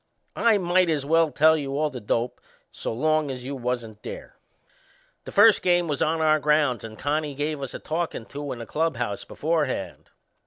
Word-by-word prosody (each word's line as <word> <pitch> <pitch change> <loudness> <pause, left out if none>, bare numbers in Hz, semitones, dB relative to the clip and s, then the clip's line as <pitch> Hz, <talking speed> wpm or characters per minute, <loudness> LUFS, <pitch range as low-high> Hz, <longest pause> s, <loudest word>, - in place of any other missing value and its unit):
I 230 -2 +4
might 180 -1 +2
as 150 -4 0
well 165 +1 +3
tell 160 +2 +4
you 140 -2 -3
all 150 0 0
the 125 -3 -7
dope, 115 +3 -2 0.3
so - - -5
long 155 +5 +1
as 130 -2 -5
you 140 +2 -5
wasn't 120 -4 -4
there. - - -8 0.9
The - - -7
first 210 0 +6
game 175 -1 +2
was 145 -3 -2
on 160 +1 +1
our 155 -1 +4
grounds 150 -5 +2
and 110 -1 -9
Connie 145 0 -1
give 150 +1 -2
us 135 - -5
a - - -5
talkin' 160 -7 -3
to 145 +2 -6
in - - -5
the 115 - -7
clubhouse 120 -7 -2
beforehand. 155 -4 -2
150 Hz, 190 wpm, -25 LUFS, 125-160 Hz, 0.9 s, first